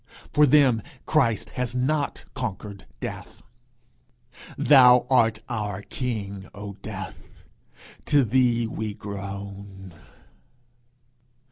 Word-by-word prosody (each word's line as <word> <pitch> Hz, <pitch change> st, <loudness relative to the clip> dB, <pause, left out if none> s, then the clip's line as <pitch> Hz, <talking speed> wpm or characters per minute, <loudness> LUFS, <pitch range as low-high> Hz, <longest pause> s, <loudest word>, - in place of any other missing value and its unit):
For 150 Hz, 0 st, +5 dB
them 130 Hz, -5 st, +5 dB, 0.2 s
Christ 125 Hz, -9 st, +1 dB
has 125 Hz, -1 st, -3 dB
not 140 Hz, +3 st, -1 dB
conquered 100 Hz, -5 st, -6 dB
Death: -, -, -7 dB, 1.1 s
Thou 125 Hz, -4 st, +7 dB
art 115 Hz, -4 st, +3 dB
our 105 Hz, -4 st, -3 dB
king, 100 Hz, -7 st, -5 dB
O 100 Hz, 0 st, -7 dB
Death! 95 Hz, -3 st, -9 dB, 0.6 s
to 145 Hz, -2 st, +4 dB
thee 120 Hz, 0 st, +2 dB
we 110 Hz, -2 st, -4 dB
groan! 100 Hz, -2 st, -8 dB
110 Hz, 90 wpm, -25 LUFS, 100-125 Hz, 1.1 s, Thou